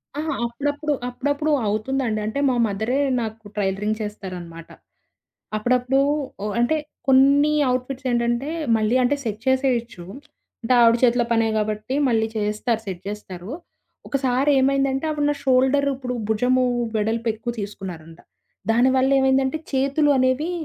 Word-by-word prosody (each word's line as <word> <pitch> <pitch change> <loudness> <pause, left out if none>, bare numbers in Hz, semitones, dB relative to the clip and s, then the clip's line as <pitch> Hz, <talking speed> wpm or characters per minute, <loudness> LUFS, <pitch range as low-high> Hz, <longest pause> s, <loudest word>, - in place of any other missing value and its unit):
ఆ! - - -4 0.3
అప్పుడప్పుడు 290 +5 -2 0.2
అప్పుడప్పుడు 285 +4 -1 0.2
అవుతుందండి. 220 +2 -1
అంటే 220 +6 -3
మా 250 - +1
మదరే 220 +7 -1 0.2
నాకు 220 -1 -6
ట్రైలరింగ్ 205 +2 -1
చేస్తారనమాట. 180 -5 -7 0.9
అప్పుడప్పుడు 250 +4 +1 0.4
ఓ - - -2
అంటే 245 +7 +2 0.3
కొన్ని 280 +3 +5 0.2
అవుట్ఫిట్సేంటంటే 250 0 -1 0.3
మళ్ళీ 220 +3 +1
అంటే 275 +4 +2
సెట్ 215 -1 -4
చేసేయొచ్చు. 245 -8 0 0.6
అంటే 230 - 0
ఆవిడ 230 0 +6
చేతిలో 240 -1 +4
పనే 225 -1 +2
కాబట్టి 215 +4 -2
మళ్ళీ 220 -2 +2
చేస్తారు 215 +2 -1
సెట్ 185 -2 -6
జేస్తారు. 195 -2 -7 0.6
ఒకసారేమైందంటే 275 +1 +1
ఆవిడ 295 -1 -1
నా - - 0
షోల్డర్ 265 +2 +3
ఇప్పుడు 255 -1 -5
భుజము 250 +4 +2 0.3
వెడల్పేక్కువ 225 +2 -1
తీసుకున్నారంట. 175 -5 -8 0.5
దానివల్ల 260 +3 +3
ఏమైందంటే 265 +2 +2
చేతులు 275 +3 +2
అనేవి 260 +6 +1
245 Hz, 115 wpm, -22 LUFS, 215-270 Hz, 0.9 s, ఆవిడ